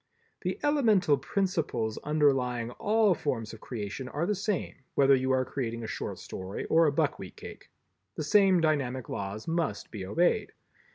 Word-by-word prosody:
The -, -, -2 dB
elemental 220 Hz, -, +4 dB
principles 160 Hz, -, -1 dB
underlying 130 Hz, -6 st, +1 dB
all 210 Hz, -, +3 dB
forms 115 Hz, -9 st, -3 dB
of 110 Hz, -, -11 dB
creation 120 Hz, +2 st, -5 dB
are 150 Hz, +4 st, -1 dB
the 210 Hz, -, +1 dB
same, 200 Hz, -2 st, -2 dB, 0.2 s
whether 140 Hz, 0 st, +5 dB
you 130 Hz, 0 st, +2 dB
are 130 Hz, 0 st, +2 dB
creating 115 Hz, -4 st, -4 dB
a -, -, -4 dB
short -, -, -4 dB
story 95 Hz, +1 st, -6 dB
or 165 Hz, 0 st, +6 dB
a -, -, +3 dB
buckwheat 140 Hz, -, -1 dB
cake. -, -, -11 dB, 0.5 s
The -, -, -3 dB
same 190 Hz, +1 st, +5 dB
dynamic 135 Hz, -6 st, 0 dB
laws 100 Hz, +2 st, -5 dB
must 165 Hz, -2 st, -2 dB
be 105 Hz, -4 st, -6 dB
obeyed. 170 Hz, -, +1 dB
140 Hz, 160 wpm, -29 LUFS, 115-175 Hz, 0.5 s, or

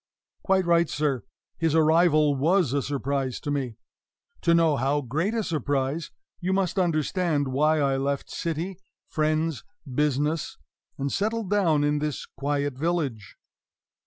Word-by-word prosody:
Quite 190 Hz, -1 st, +2 dB
right, 170 Hz, -1 st, +3 dB
sir; 145 Hz, -5 st, 0 dB, 0.4 s
his 165 Hz, -1 st, +1 dB
arrival 155 Hz, -2 st, +4 dB
was 155 Hz, +1 st, +2 dB
a 140 Hz, -, +1 dB
surprise 135 Hz, -1 st, -2 dB
to 145 Hz, -, -3 dB
me. 130 Hz, -6 st, -2 dB, 0.6 s
To 170 Hz, 0 st, +4 dB
know 165 Hz, -3 st, +4 dB
how 140 Hz, +3 st, +1 dB
great 160 Hz, -, -1 dB
a 225 Hz, -, 0 dB
surprise, 145 Hz, -1 st, -1 dB, 0.3 s
you 185 Hz, +2 st, -1 dB
must 190 Hz, 0 st, 0 dB
understand 160 Hz, -3 st, +1 dB
why 155 Hz, +4 st, +2 dB
I 135 Hz, -2 st, +2 dB
left 140 Hz, +1 st, -1 dB
city, 170 Hz, +3 st, -3 dB, 0.3 s
friends, 155 Hz, -2 st, 0 dB, 0.2 s
business, 150 Hz, +3 st, -1 dB, 0.4 s
and 140 Hz, 0 st, -2 dB
settled 215 Hz, 0 st, -1 dB
down 165 Hz, -8 st, +3 dB
in 145 Hz, 0 st, +1 dB
this 150 Hz, -2 st, -3 dB
quiet 140 Hz, -1 st, -2 dB
village. 145 Hz, -, -2 dB
150 Hz, 135 wpm, -26 LUFS, 140-170 Hz, 0.6 s, arrival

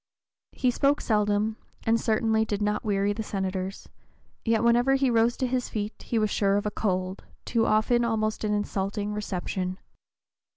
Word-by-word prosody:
He 255 Hz, -, +1 dB
spoke 280 Hz, +4 st, +2 dB
seldom, 210 Hz, 0 st, +1 dB, 0.3 s
and 225 Hz, 0 st, +2 dB
certainly 220 Hz, 0 st, +2 dB
did 210 Hz, -2 st, -2 dB
not 210 Hz, 0 st, 0 dB
weary 205 Hz, -1 st, +1 dB
the 220 Hz, -, -4 dB
Senators, 190 Hz, -2 st, -3 dB, 0.6 s
yet 225 Hz, -1 st, +2 dB
whenever 240 Hz, +3 st, +4 dB
he 270 Hz, -2 st, +2 dB
rose 230 Hz, +1 st, +3 dB
to 260 Hz, -, 0 dB
his 250 Hz, 0 st, -1 dB
feet 210 Hz, 0 st, -3 dB
he 235 Hz, -, -2 dB
was 215 Hz, -1 st, +1 dB
sure 200 Hz, -1 st, +2 dB
of 205 Hz, -, -2 dB
a 210 Hz, -, 0 dB
cold, 185 Hz, -2 st, -2 dB, 0.2 s
too 230 Hz, -2 st, +1 dB
often 235 Hz, +3 st, +3 dB
almost 215 Hz, -2 st, 0 dB
an 210 Hz, -, 0 dB
insulting, 205 Hz, 0 st, -2 dB
reception. 185 Hz, -2 st, -3 dB
215 Hz, 165 wpm, -27 LUFS, 205-230 Hz, 0.6 s, whenever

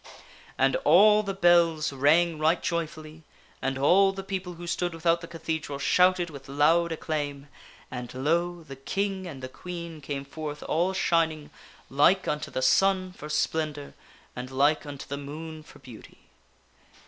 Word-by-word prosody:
S* -, -, -15 dB, 0.5 s
And 135 Hz, 0 st, +3 dB
all 210 Hz, +7 st, +6 dB
the 195 Hz, -2 st, -4 dB
bells 170 Hz, -5 st, +3 dB
rang 155 Hz, +4 st, +3 dB
right 160 Hz, +3 st, +2 dB
joyfully, 160 Hz, -2 st, -4 dB, 0.4 s
and 135 Hz, 0 st, -1 dB
all 190 Hz, +8 st, +4 dB
the 195 Hz, 0 st, -7 dB
people 190 Hz, -2 st, -4 dB
who 175 Hz, +1 st, -9 dB
stood 175 Hz, 0 st, -2 dB
without 165 Hz, +1 st, +1 dB
the 170 Hz, -, -8 dB
cathedral 160 Hz, -3 st, -4 dB
shouted 180 Hz, +4 st, +3 dB
with 135 Hz, -2 st, -11 dB
loud 165 Hz, +4 st, +3 dB
acclaim, 145 Hz, -3 st, -4 dB, 0.4 s
and 125 Hz, -1 st, -6 dB
lo! 170 Hz, +6 st, -1 dB
the 135 Hz, -3 st, -10 dB
King 190 Hz, +6 st, -3 dB
and 135 Hz, -6 st, -9 dB
the -, -, -3 dB
Queen 170 Hz, +2 st, -8 dB
came 140 Hz, 0 st, -5 dB
forth 150 Hz, +1 st, -7 dB
all 175 Hz, +4 st, 0 dB
shining, 165 Hz, -5 st, 0 dB, 0.4 s
like 150 Hz, +8 st, +3 dB
unto 150 Hz, 0 st, -2 dB
the 130 Hz, -, -3 dB
sun 185 Hz, +6 st, +3 dB
for 150 Hz, -4 st, -10 dB
splendor 150 Hz, -1 st, -2 dB, 0.4 s
and 125 Hz, +1 st, -6 dB
like 145 Hz, +3 st, +1 dB
unto 140 Hz, -2 st, -7 dB
the 140 Hz, -, -4 dB
moon 155 Hz, +3 st, -8 dB
for 155 Hz, -, -16 dB
beauty. 125 Hz, -5 st, -14 dB
160 Hz, 160 wpm, -27 LUFS, 145-175 Hz, 0.5 s, all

